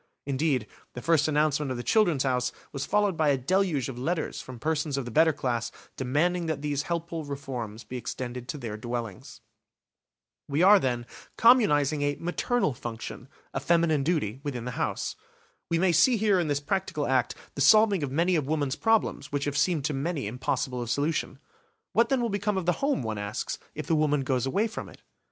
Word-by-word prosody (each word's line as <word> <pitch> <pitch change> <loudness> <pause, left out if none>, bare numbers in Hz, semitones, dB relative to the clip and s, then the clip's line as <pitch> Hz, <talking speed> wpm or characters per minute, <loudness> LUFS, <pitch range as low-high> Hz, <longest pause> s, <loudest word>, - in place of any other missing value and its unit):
Indeed, 140 -3 0 0.3
the 125 - -6
first 165 -3 +3
announcement 150 -1 +1
of 130 - -3
the 120 - -4
"Children's 175 - +3
House" 125 -2 0 0.2
was 140 -1 -4
followed 205 -3 +2
by 155 -2 +2
a 140 - +3
deluge 165 -1 +1
of 125 -2 -6
letters 160 +5 -2
from 130 -1 -9
persons 150 +1 -1
of 135 - -2
the 120 - -6
better 160 +5 +5
class 120 -5 -2 0.2
demanding 165 +7 0
that 155 -2 -2
these 145 -1 0
helpful 170 0 -3
reforms 125 -6 -6
be 130 - -6
extended 125 +1 -5
to 150 - -4
their 115 -6 -5
dwellings. 115 -3 -6 1.1
We 145 +4 +1
are, 200 +2 +8
then, 120 -5 -1 0.3
communising 155 - +5
a 145 0 +1
"maternal 175 - 0
function", 120 +1 -7 0.3
a - - -1
feminine 165 0 +2
duty, 135 - -1
within 130 -5 -4
the 125 - -3
house. - - -2 0.5
We 170 - +2
may 185 +1 +3
see 230 +9 +5
here 205 -3 +3
in 170 - 0
this 145 -1 0
practical 155 -2 -1
act 130 -3 +1 0.2
the 140 - -4
solving 215 +3 +6
of 140 -3 -2
many 170 +5 +2
of 150 -5 0
woman's 145 -2 0
problems 185 -4 +1
which 145 0 -1
have 145 -1 -2
seemed 155 -2 +1
to 150 - 0
many 145 0 -2
impossible 125 +2 -2
of 120 - -5
solution. 145 +1 -1 0.6
What 230 - +3
then 270 -2 +2
will 235 - 0
become 205 0 -1
of 185 - -2
the 175 - +4
home, 280 - +1
one 110 -2 -3
asks, 105 +1 -4 0.2
if - - -5
the - - 0
woman 150 -2 +2
goes 130 -1 0
away 200 +11 +1
from 220 - -6
it? - - -17
145 Hz, 195 wpm, -27 LUFS, 130-170 Hz, 1.1 s, are